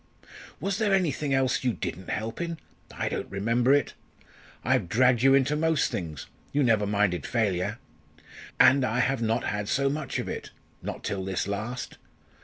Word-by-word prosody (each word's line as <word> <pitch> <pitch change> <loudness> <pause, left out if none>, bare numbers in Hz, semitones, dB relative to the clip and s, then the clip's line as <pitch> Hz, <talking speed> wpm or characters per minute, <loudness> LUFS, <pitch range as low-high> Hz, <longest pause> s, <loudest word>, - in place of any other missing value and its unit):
"Was 195 +1 -2
there 205 -3 +3
anything 150 -6 0
else 135 -1 +1
you 125 -2 +1
didn't 90 -1 -5
help 110 +6 -3
in? 170 -1 -3 0.3
I - - -3
don't - - -3
remember 115 +6 +1
it. 145 0 +3 0.7
I've 85 - +1
dragged 125 +3 +4
you 135 +1 +6
into 140 +2 +2
most 160 -1 +1
things. 80 -6 -5 0.3
You 145 0 +2
never 110 -4 +3
minded 100 -3 +1
failure. 105 -2 0 0.8
And 135 0 +6
I 125 0 0
have 130 0 +1
not 115 +1 +1
had 105 -1 -2
so 140 0 +2
much 150 -2 -3
of - - -3
it - - -5 0.3
not - - -6
till 100 -3 -2
this 95 0 -2
last. 110 +5 -4
120 Hz, 170 wpm, -27 LUFS, 105-140 Hz, 0.8 s, you